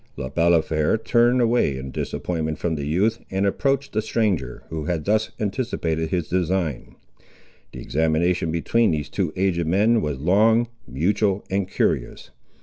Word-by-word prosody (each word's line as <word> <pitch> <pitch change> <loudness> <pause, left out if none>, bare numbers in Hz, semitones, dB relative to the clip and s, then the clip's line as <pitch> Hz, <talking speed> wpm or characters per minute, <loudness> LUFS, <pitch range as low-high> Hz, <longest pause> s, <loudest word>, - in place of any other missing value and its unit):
Le 65 - -5
Balafré 80 +1 +2
turned 120 +2 +3
away 115 - +2
in 65 0 -6
disappointment 80 0 -3
from 85 - -1
the 70 -2 -3
youth, 105 +9 +1
and 95 +1 0
approached 135 +7 0
the 110 - +1
stranger, 110 -4 -1
who 80 -2 -4
had 80 -2 -2
thus 110 +1 +1
anticipated 95 -8 -2
his 85 -3 -1
design. 90 -4 -1 0.8
The - - -9
examination 80 +3 0
between 110 +8 +2
these 75 -3 -2
two - - -1
aged 90 -3 0
men 105 +6 +3
was 75 -3 -2
long, 110 - +3 0.2
mutual, 95 +7 0
and 95 -1 0
curious. 70 -10 -1
90 Hz, 145 wpm, -23 LUFS, 80-110 Hz, 0.8 s, turned